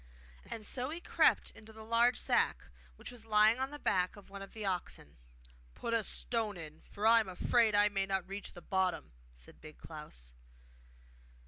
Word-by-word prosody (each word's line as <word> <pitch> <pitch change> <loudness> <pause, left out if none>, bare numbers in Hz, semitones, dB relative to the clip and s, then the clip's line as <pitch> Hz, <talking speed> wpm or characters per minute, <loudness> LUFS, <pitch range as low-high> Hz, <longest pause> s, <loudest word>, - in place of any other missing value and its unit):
And 215 - -6
so 255 +4 -1
he 325 +3 -4
crept - - +3
into 220 0 -14
the 220 0 -11
large 230 +2 +3
sack, - - +1 0.3
which - - -8
was 245 -3 -7
lying 215 +2 +4
on 265 +1 -1
the 295 - -8
back 180 -9 0
of 200 -1 -15
one 200 0 -8
of 195 - -10
the 215 -2 -5
oxen. 185 - -4 0.6
'Put 230 - -3
a 230 -1 +2
stone 220 -2 -2
in, 155 -2 -10
for 205 - -4
I 230 +1 +7
am 215 -4 -2
afraid 220 +4 +2
I 205 0 +6
may 195 -1 -1
not 190 -2 -1
reach 195 +1 -6
the 175 - -11
bottom,' 190 -1 -1 0.2
said - - -15
Big 155 0 -12
Klaus. 105 - -10
205 Hz, 190 wpm, -33 LUFS, 185-230 Hz, 0.6 s, I